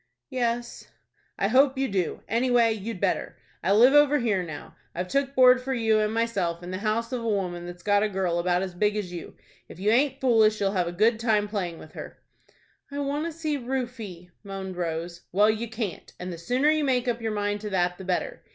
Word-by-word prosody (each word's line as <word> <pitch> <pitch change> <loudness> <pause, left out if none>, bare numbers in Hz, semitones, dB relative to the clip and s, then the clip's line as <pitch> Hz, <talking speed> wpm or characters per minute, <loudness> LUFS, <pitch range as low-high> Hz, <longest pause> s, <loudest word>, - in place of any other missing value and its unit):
"Yes." 240 -1 -2 0.5
"I 195 - +1
hope 265 +4 +4
you 270 0 +1
do. 190 -6 -2
Anyway, 235 0 +3
you'd 220 -1 -6
better. 195 -1 -1 0.2
I 185 - 0
live 240 +6 +6
over 295 0 +6
here 220 -8 +1
now. 160 -4 -8 0.2
I've 180 +1 -2
took 275 +2 0
board 255 0 +6
for 265 +1 -2
you 225 -2 +2
and 215 0 +1
myself 200 -7 -1
in 175 - -6
the 185 - -3
house 220 +3 -1
of 250 -2 -2
a - - -2
woman 180 -4 -2
that's 175 0 -10
got 205 -1 +3
a 215 - +1
girl 185 -3 -1
about 180 +1 +1
as 185 -2 -5
big 210 +3 +1
as 195 -4 -4
you. 170 - -8 0.3
If - - -11
you 205 +3 +2
aint 270 +3 +2
foolish 220 -5 +4
you'll 195 -1 +1
have 180 -3 0
a - - -2
good 220 +6 +2
time 215 -3 +2
playing 185 -5 -3
with 155 - -12
her." - - -9 0.7
"I 285 - -7
want 285 +2 -1
to - - -4
see 310 -2 -2
Rufie," 235 -9 -5
moaned 195 -2 -6
Rose. 170 0 -4
"Well, 210 +4 +4
you 220 +1 -4
can't, 220 -4 -5
and 180 0 -5
the 165 - -8
sooner 255 - +2
you 310 -1 +1
make 255 -2 +1
up 235 -1 -1
your 225 -1 -2
mind 205 0 -1
to 210 - -4
that 180 -2 0
the - - -7
better. 190 - -2
215 Hz, 225 wpm, -26 LUFS, 185-250 Hz, 0.7 s, live